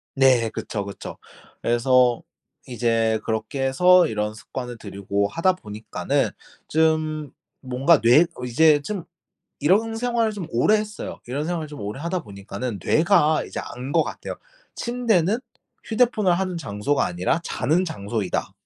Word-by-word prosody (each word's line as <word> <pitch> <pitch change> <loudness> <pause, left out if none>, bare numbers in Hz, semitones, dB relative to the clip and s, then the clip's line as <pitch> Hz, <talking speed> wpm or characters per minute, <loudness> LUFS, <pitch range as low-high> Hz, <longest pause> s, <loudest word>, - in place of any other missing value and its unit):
네 130 -4 +4
그쵸, 105 -1 -4
그쵸. 100 - -8 0.4
그래서 125 0 +3 0.5
이제 115 -2 +1
그렇게 110 +4 -2
해서 180 +7 +5
이런 105 -1 -2
습관을 120 +2 -7
들이고 100 -1 -2
하다 175 - +2
보니까는 110 - -2 0.4
좀 155 -2 +1 0.3
뭔가 135 +5 +3
뇌 125 +9 +6 0.2
이제 145 +4 +4
좀 180 +4 -5 0.5
이런 210 +9 +2
생활을 235 -2 0
좀 200 -5 -6
오래 125 - +3
했어요. 210 -1 -5
이런 135 +5 -3
생활을 165 -1 -2
좀 150 -4 -10
오래 105 +6 -5
하다 170 +3 -2
보니까는 100 +3 -6
뇌가 155 -2 +3
이제 - - -5
안 125 +3 -7
것 - - +3
같아요. - - -6 0.4
'침대는 230 -5 +1 0.5
휴대폰을 220 -4 +2
하는 185 -2 -2
장소가 135 -2 -1
아니라 90 - 0
자는 160 +4 0
장소이다.' 105 - -3
140 Hz, 295 characters per minute, -23 LUFS, 115-180 Hz, 0.5 s, 뇌